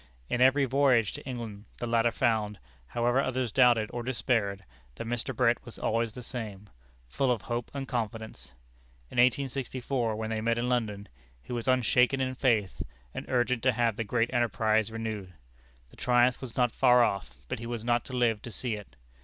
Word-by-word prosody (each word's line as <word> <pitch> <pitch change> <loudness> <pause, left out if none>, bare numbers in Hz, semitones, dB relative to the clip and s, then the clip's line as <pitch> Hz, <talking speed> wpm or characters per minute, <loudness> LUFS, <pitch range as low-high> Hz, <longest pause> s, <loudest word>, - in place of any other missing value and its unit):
In 120 - 0
every 135 +2 +5
voyage 130 -5 +3
to - - -8
England 115 -5 -6
the - - -3
latter 115 0 +3
found 110 -3 0 0.3
however 120 - +1
others 130 -3 -1
doubted 120 -4 +4
or 120 - -3
despaired 115 -6 -1 0.3
that - - -6
Mr. 120 +2 -2
Brett 120 0 +2
was 120 - -9
always 115 0 0
the 125 - -8
same 105 -6 -7 0.4
full 135 - 0
of 120 -4 0
hope 120 0 -3
and 135 -1 -5
confidence. 110 - -5 0.6
In - - -8
1864, 130 -2 +1
when 110 +1 -3
they 110 -1 -1
met 115 +1 +1
in 120 +1 0
London, 105 -5 -1 0.3
he 125 - -8
was 120 0 -3
unshaken 125 +1 +3
in 130 -1 0
faith, 115 -8 +1 0.3
and - - -6
urgent 125 -1 +1
to 130 +1 +3
have 115 -1 +1
the 115 - -2
great 115 +2 0
enterprise 110 -2 +2
renewed. 110 -5 -5 0.6
The - - -18
triumph 125 0 +3
was 130 -4 -8
not 125 -2 +3
far 125 -1 +5
off, 100 - -1 0.2
but - - -4
he 115 - -6
was 120 -2 -4
not 120 0 +1
to 130 - -9
live 115 -4 +1
to 120 - -8
see 120 +1 -3
it. 105 -2 -8
120 Hz, 185 wpm, -29 LUFS, 110-125 Hz, 0.6 s, every